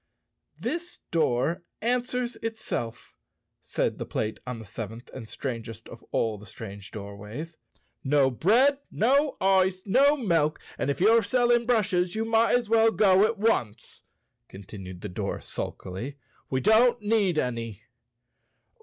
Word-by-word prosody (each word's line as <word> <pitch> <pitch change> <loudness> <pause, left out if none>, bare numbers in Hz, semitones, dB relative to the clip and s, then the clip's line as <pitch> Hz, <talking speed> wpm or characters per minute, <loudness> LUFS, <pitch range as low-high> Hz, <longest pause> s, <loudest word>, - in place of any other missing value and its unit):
"This 345 +1 -4
door 165 +2 +1 0.2
answers 245 +1 -1
itself," 220 - -5 0.5
said - - -2
the - - -3
plate 110 0 -2
on 125 -1 -4
the 110 - -9
sev¬ 105 +2 -6
enth 115 +3 -12
and 115 -4 -8
strangest 115 -4 -6
of - - -12
all 110 -3 0
the 105 - -13
strange 100 -2 -9
doorways. 105 +10 -8 0.5
"No 135 -1 +3
bread, 245 - +3
no 275 +6 +2
ice, 190 -1 +3
no 275 +8 +4
milk; 165 - +1 0.2
and - - 0
if 140 - -1
you're 225 +5 +5
selling 240 +2 +2
brushes 185 -6 +1
you 220 +1 -1
might 225 +1 +3
as 245 -2 0
well 225 +1 +5
go 200 -2 +5
at 225 +1 -1
once," 125 - -1 0.4
continued 95 -2 -10
the - - -4
door 90 - -3
sulkily. 115 +10 -6 0.3
"We 130 0 0
don't 235 +4 +5
need 205 -5 +2
any." 115 -6 -2
180 Hz, 140 wpm, -27 LUFS, -, 0.5 s, you're